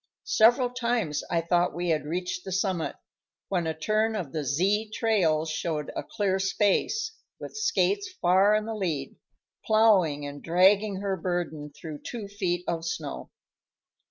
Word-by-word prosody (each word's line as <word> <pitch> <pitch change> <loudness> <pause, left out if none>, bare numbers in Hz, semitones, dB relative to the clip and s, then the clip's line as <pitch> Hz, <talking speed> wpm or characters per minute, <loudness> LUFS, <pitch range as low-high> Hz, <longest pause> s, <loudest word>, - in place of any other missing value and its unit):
Several 245 +3 +4
times 235 -11 -1
I 170 -1 +1
thought 175 +1 +1
we 175 0 -2
had 155 -2 +1
reached 180 +2 -3
the 190 - -7
summit, 185 -3 -1 0.5
when 175 -4 0
a 160 - -3
turn 215 +6 +1
of 175 -10 -4
the 155 0 -3
Z 195 - +1
trail 175 -9 +2
showed 155 -1 -3
a - - -2
clear 195 -2 -1
space, 210 - +1 0.3
with - - -8
Skates 410 -3 +1
far 190 +4 +4
in 215 0 0
the 225 - -4
lead, 165 -10 -3 0.5
ploughing 195 -10 +3
and 145 0 -7
dragging 190 +3 +3
her 200 -1 -1
burden 165 -4 -3
through 155 -3 -7
two 225 -4 -6
feet 185 -4 -2
of 165 -1 -2
snow. 160 -3 -5
185 Hz, 155 wpm, -27 LUFS, 165-215 Hz, 0.5 s, Several